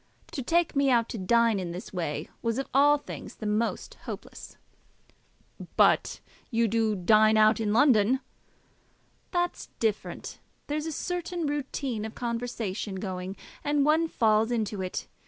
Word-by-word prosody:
To 270 - -4
take 330 +5 +1
me 280 0 +3
out 235 -2 +3
to 225 - -5
dine 230 +2 +3
in 175 -2 -4
this 180 +3 -8
way 160 -4 -3
was 230 0 -1
of 270 - -2
all 290 +2 +6
things 290 - -9
the 215 - -8
most 215 +2 -1
hopeless." - - -8 1.2
"But - - +3 0.3
you 230 -1 +2
do 220 0 +1
dine 215 +3 +5
out, 215 +1 +5
in 215 -2 0
London." 245 -1 +4 1.1
"That's 350 -1 -2
different. 220 -2 -2 0.3
There's 300 +2 -2
a - - -2
certain 350 +1 -3
routine 275 -5 -2
of 220 0 -6
conversation 230 -4 -3
going, 185 -1 -4 0.3
and 290 -1 +2
one 315 +2 +3
falls 220 -5 +2
into 215 -4 -1
it. 185 -1 -4
230 Hz, 145 wpm, -28 LUFS, 210-280 Hz, 1.2 s, all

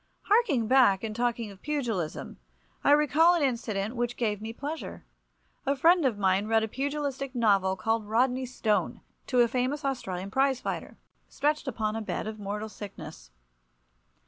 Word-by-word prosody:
Harking 395 - +3
back 235 -6 +5
and 215 -1 -4
talking 235 -2 -1
of 195 - -15
pugilism, 235 - -3 0.4
I - - +3
recall 300 +4 +5
an 335 - +1
incident 230 -4 -1
which 240 0 -2
gave 210 -4 -1
me 220 +1 -5
pleasure. 290 +7 -6 0.6
A 275 0 +1
friend 335 +3 +4
of 230 -5 -2
mine 195 +1 +2
read 225 0 +3
a - - -1
pugilistic 275 +1 -3
novel 200 -5 +3
called 220 +2 -1
"Rodney 250 +3 +1
Stone" 220 -4 -1 0.3
to 250 -2 +3
a 240 - +5
famous 260 +5 -1
Australian 195 -8 -3
prize 265 +1 +2
fighter, - - -5 0.3
stretched 295 +1 0
upon 215 -4 -2
a 225 - -2
bed 215 - -3
of 215 0 -6
mortal 210 +2 -4
sickness. 200 - -10
235 Hz, 160 wpm, -28 LUFS, 210-275 Hz, 0.6 s, back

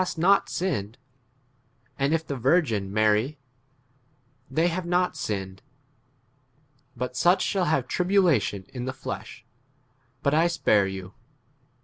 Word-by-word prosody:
to 175 -2 -5
not 195 +4 +4
sinned; 125 - -2 1.0
and 140 +2 +1
if 160 0 0
the 140 - -4
virgin 120 - +1
marry, 110 +7 +2 1.1
they 160 +6 +2
havei 175 +1 -2
not 180 +1 +1
sinned: 95 -2 -4 1.4
but 125 +1 -4
such 175 +8 +3
shall 190 -3 0
have 145 -6 +1
tribulation 165 - +2
in 125 -2 -4
the 130 - -3
flesh; - - -7 0.8
but 140 - +2
I 160 +3 +4
spare 105 - +2
you. 95 0 -7
140 Hz, 120 wpm, -26 LUFS, 105-175 Hz, 1.4 s, not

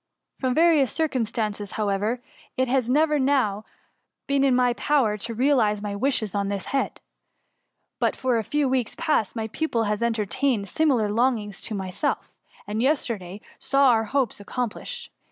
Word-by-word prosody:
From 255 -2 0
various 320 -5 +4
circumstances, 225 -9 -2
however, 210 +3 -1 0.3
it 260 0 +2
has 250 -1 +1
never 300 +3 +3
till 265 - +1
now 220 -7 +1 0.6
been 275 0 +1
in 265 -2 +4
my 250 -1 +3
power 250 -5 +1
to 230 +3 -4
realize 235 -5 +2
my 205 -1 -4
wishes 220 -3 0
on 200 -1 0
this 200 -2 -3
head; 275 - -1 1.0
but - - +1
for 250 -3 +1
a - - -2
few 295 +6 0
weeks 255 -3 0
past, 270 - 0
my 220 -1 -2
pupil 235 -3 -1
has 210 0 -1
entertained 225 0 0
simi 305 - +2
lar 215 -3 0
longings 220 -3 0
to 215 - -4
myself; 190 +8 -3 0.3
and 210 +2 -2
yesterday 220 - -1 0.2
saw 275 0 +3
our 225 -2 +3
hopes 260 -1 -1
^^accomplished. 250 - -5
235 Hz, 160 wpm, -25 LUFS, 210-275 Hz, 1.0 s, various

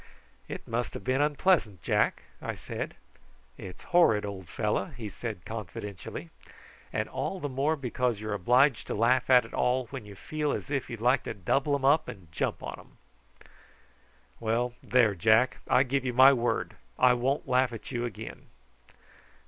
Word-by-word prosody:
"It - - -7
must 120 +1 -2
have - - -6
been 130 +2 +1
unpleasant, 145 - +2
Jack," - - +1 0.2
I - - -4
said. - - -6 0.6
"It's 90 - -10
horrid, 115 -13 +4
old 95 -4 -7
fellow," 105 -1 0
he 120 - -8
said 105 -3 -6
confidentially; 100 -5 -7 0.6
"and - - -1
all 190 - -3
the 145 - -3
more 140 +4 0
because 125 -4 -1
you 110 - -6
are - - -1
obliged 125 +6 +3
to - - -2
laugh 125 +4 +2
at 125 -2 +6
it 115 - -13
all 125 +1 +1
when 135 -4 -6
you 100 - -10
feel 150 +7 -2
as 140 - -5
if 140 -2 -1
you'd 115 -2 -6
like 125 +2 +3
to - - -4
double 135 - +1
'em 135 -1 -2
up 145 +4 +4
and 90 -6 -10
jump - - -2
on - - -6
'em." - - -18 1.4
"Well, 120 +2 0
there, 120 -5 +3
Jack; 110 +6 +3
I 130 - +5
give 135 0 -1
you 125 -1 -2
my 130 +3 +8
word 120 -2 -1 0.2
I 125 -1 +6
won't 135 +5 -1
laugh 130 0 +3
at 115 +2 -8
you 120 -2 -2
again." 120 -5 -7
125 Hz, 175 wpm, -29 LUFS, 110-135 Hz, 1.4 s, my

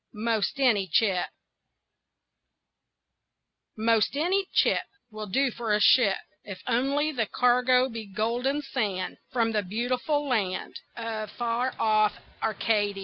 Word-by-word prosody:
'MOST 220 +2 -1
ANY 220 -8 +3
CHIP 185 0 +2 2.5
'Most 225 +2 +2
any 375 +5 +1
chip - - +3 0.3
Will 215 0 -7
do 265 +6 +1
for 230 -2 -2
a - - +1
ship, 210 -2 +5 0.3
If 195 -3 -9
only 275 +5 +1
the 235 -7 -1
cargo 250 +2 +3
be 225 -4 -7
Golden 240 +8 -1
sand 205 -9 -3
From 230 -2 +1
the 215 -1 +1
beautiful 250 - -1
land 200 -8 -2 0.2
Of 220 -2 -4
far 240 +3 -2
off 215 -1 +2 0.2
Arcady. 210 -2 0
230 Hz, 120 wpm, -27 LUFS, 210-255 Hz, 2.5 s, ship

